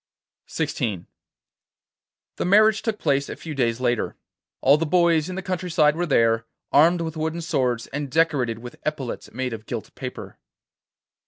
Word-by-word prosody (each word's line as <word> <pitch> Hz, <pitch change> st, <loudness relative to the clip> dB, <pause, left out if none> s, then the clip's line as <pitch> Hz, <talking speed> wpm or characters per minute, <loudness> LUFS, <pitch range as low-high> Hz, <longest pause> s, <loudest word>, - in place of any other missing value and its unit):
XVI 95 Hz, -6 st, -2 dB, 1.3 s
The -, -, -1 dB
marriage 215 Hz, +3 st, +5 dB
took 220 Hz, -2 st, -2 dB
place 140 Hz, -5 st, 0 dB
a -, -, -5 dB
few 160 Hz, -, -7 dB
days 120 Hz, -4 st, 0 dB
later. 120 Hz, -2 st, 0 dB, 0.4 s
All 140 Hz, +2 st, +5 dB
the 165 Hz, +1 st, -1 dB
boys 170 Hz, -1 st, +3 dB
in 185 Hz, -, -5 dB
the 190 Hz, -, -4 dB
country 185 Hz, -1 st, -3 dB
side 150 Hz, -2 st, +4 dB
were 175 Hz, +1 st, -1 dB
there, 115 Hz, -4 st, +2 dB, 0.2 s
armed 170 Hz, +4 st, +5 dB
with 160 Hz, -1 st, -4 dB
wooden 160 Hz, +2 st, -2 dB
swords, 130 Hz, -8 st, 0 dB
and 145 Hz, 0 st, -5 dB
decorated 140 Hz, -6 st, +1 dB
with 120 Hz, +1 st, -10 dB
epaulets 140 Hz, -5 st, -4 dB
made 130 Hz, 0 st, -3 dB
of 110 Hz, -1 st, -8 dB
gilt -, -, -5 dB
paper. -, -, -8 dB
150 Hz, 160 wpm, -24 LUFS, 125-170 Hz, 1.3 s, marriage